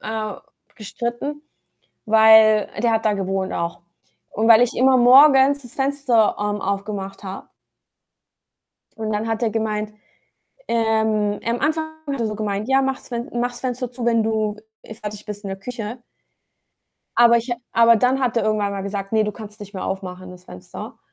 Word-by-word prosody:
äh, 215 -1 -4 0.4
gestritten, 240 +6 -5 0.7
weil 220 -1 +6
der 235 - +3
hat 225 0 0
da 215 - +3
gewohnt 195 -1 -2
auch. 170 0 -4 0.5
Und 220 +2 -1
weil 230 0 +7
ich 245 - +1
immer 260 +1 +4
morgens 270 +2 +6
das 245 - -11
Fenster, 270 -5 +1
ähm, 205 0 -2
aufgemacht 195 0 -4
habe. 190 0 -8 1.5
Und 220 -1 -3
dann 210 +2 -2
hat 225 +1 -2
er 225 - +1
gemeint 215 -1 -2 0.8
ähm, 220 -2 +1
am 235 +1 -1
Anfang 315 +2 0 0.3
hat 275 -3 -3
er 230 - 0
so 215 - -4
gemeint: 210 0 -3
„Ja, 270 0 +4
mach's 265 -1 -3
Fen 240 +1 -5
mach's 245 +1 -2
Fenster 250 -1 -3
zu, 240 -1 -5
wenn 230 -1 +3
du, 215 -1 -1 0.3
äh, - - -11
fertig 210 -1 -8
bist 210 -1 -7
in - - -4
der 195 0 -5
Küche.“ 230 +2 -6 1.2
Aber 235 0 +6
ich 235 +2 -6
ha 240 - -1 0.2
aber 230 0 +5
dann 255 +4 +1
hat 245 -3 -1
er 230 - +1
irgendwann 210 -2 0
mal 195 -1 -4
gesagt: 200 0 -5
„Ne, 220 -1 +3
du 210 - -3
kannst 210 -1 -11
nicht 205 -1 -10
mehr 190 - -5
aufmachen, 185 -1 -6
das 180 0 -14
Fenster.“ 90 - -10
220 Hz, 175 wpm, -21 LUFS, 205-240 Hz, 1.5 s, weil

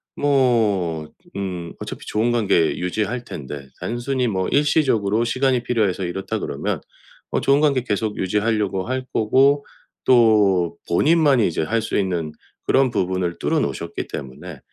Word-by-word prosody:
뭐, 110 - +1 0.3
음 90 -4 -4
어차피 - - -7
좋은 110 +3 0
관계 100 -8 +2
유지할 110 +7 -2
텐데. 70 - -8
단순히 125 +2 -2
뭐 95 -4 -1
일시적으로 130 -8 +2
시간이 130 +1 +1
필요해서 105 -7 0
이렇다 90 +2 -3
그러면 - - -3 0.5
어 - - +1
좋은 140 +2 +3
관계 140 -5 +2
계속 105 0 -2
유지하려고 105 -1 0
할 130 0 -2
거고 135 +6 +3 0.4
또 105 -8 +4
본인만이 145 - +4
이제 80 - -2
할 115 +8 0
수 110 - -2
있는 85 -6 -1 0.3
그런 135 -1 +3
부분을 90 -4 -1
뚫어 - - +1
놓으셨기 - - -4
때문에 65 -3 -8
110 Hz, 310 characters per minute, -21 LUFS, 95-130 Hz, 0.5 s, 또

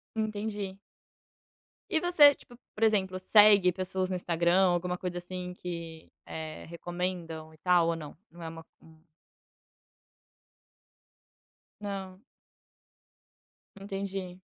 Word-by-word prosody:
Entendi. 210 -3 -3 1.1
E 320 - +3
você, 310 -5 +7
tipo, 240 - -16 0.2
por 220 - -2
exemplo, 190 -4 +2
segue 200 -1 +6
pessoas 185 0 -2
no - - 0
Instagram 175 +1 +3
ou 175 - +3
alguma 180 +1 -2
coisa 180 -1 -4
assim, 180 0 -6
que 170 -3 -7 0.2
eh, 155 -1 -7
recomendam 170 -2 -4
e 155 - -18
tal, 175 -1 +3
ou 165 - +1
não? 150 -3 -8
Não 170 0 -12
é - - -5
uma 165 0 -8 0.2
hum. 160 -1 -19 2.8
Não. 195 -2 -6 1.6
Entendi. 195 -2 -5
185 Hz, 110 wpm, -29 LUFS, 170-195 Hz, 2.8 s, você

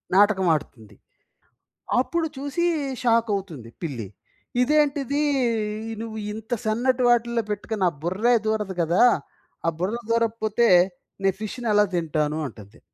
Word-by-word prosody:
నాటకమాడుతుంది. 165 - +2 1.0
అప్పుడు 325 +5 0
చూసీ 285 +5 -1 0.4
షాకవుతుంది 200 - 0
పిల్లి. 125 -10 -4 0.5
ఇదేంటిదీ 285 0 +2 0.7
ఇ - - -4
నువ్వు 220 -1 -6 0.2
ఇంత 220 +3 -5
సన్నటి 245 +4 +1
వాటిల్లో 235 -1 +2
పెట్టుకుని 210 0 -4
నా 180 - +5
బుర్రే 205 +8 +2
దూరదు 210 -3 -1
గదా! 170 +7 +3 0.6
ఆ - - +6
బుర్ర 195 +6 -1
దూరకపోతే, 230 0 +1 0.6
నే 195 - +4
ఫిష్‌ని 225 +3 -5
ఎలా 210 0 +5
తింటాను, 155 -2 0
అంటది. 105 -5 -13
215 Hz, 110 wpm, -24 LUFS, 175-240 Hz, 1.0 s, ఆ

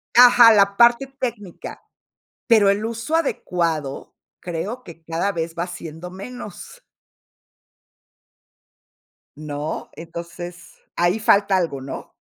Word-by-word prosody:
Ajá, 240 -1 +9
la 200 -1 +4
parte 240 +4 +5
técnica, 240 -9 -6 0.7
pero 220 -5 +5
el 200 +2 0
uso 230 +7 -2
adecuado 165 - -2 0.3
creo 180 +9 -5
que 165 -1 -13
cada 165 +5 -1
vez 165 -2 -4
va 170 - -1
siendo 175 -1 -8
menos. 205 +2 -9 2.6
¿No? 150 0 -5
Entonces 170 +1 -9 0.2
ahí 175 +5 +1
falta 200 -2 +3
algo, 155 -7 -2
¿no? 135 - -8
180 Hz, 105 wpm, -22 LUFS, 165-225 Hz, 2.6 s, Ajá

